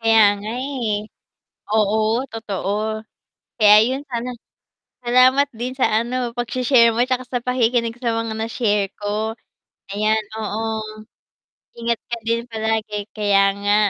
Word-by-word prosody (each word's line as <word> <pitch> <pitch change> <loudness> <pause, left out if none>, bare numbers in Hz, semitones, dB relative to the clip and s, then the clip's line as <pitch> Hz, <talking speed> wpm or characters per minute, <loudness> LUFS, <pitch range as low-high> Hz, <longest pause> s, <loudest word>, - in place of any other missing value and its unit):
Kaya 225 0 +5 0.2
nga, 210 +2 -6
eh, 255 -6 -2 0.8
oo, 215 -1 +3 0.4
totoo, 205 -4 -4 0.9
kaya 210 -2 +7
yun 265 +2 -2
sana 240 0 -3 0.8
salamat 255 +3 +5
din 250 +2 -3
sa, 260 - +3 0.2
ano, 240 0 -3
pagshi-share 245 0 +3
mo 240 - +3
tsaka 255 0 -1
sa 250 - -1
pakikinig 240 -2 +1
sa 240 - 0
mga 230 -1 -2
na-share 220 -2 0
ko 215 +2 -3 0.6
ayan, 215 +1 +1 0.2
oo, 215 0 -3 1.2
ingat 235 -1 -1
ka 235 - -2
din 230 +1 -1
palagi. 220 -2 -2
Kaya 205 -2 +2 0.2
nga 205 0 +2
230 Hz, 125 wpm, -21 LUFS, 215-245 Hz, 1.2 s, kaya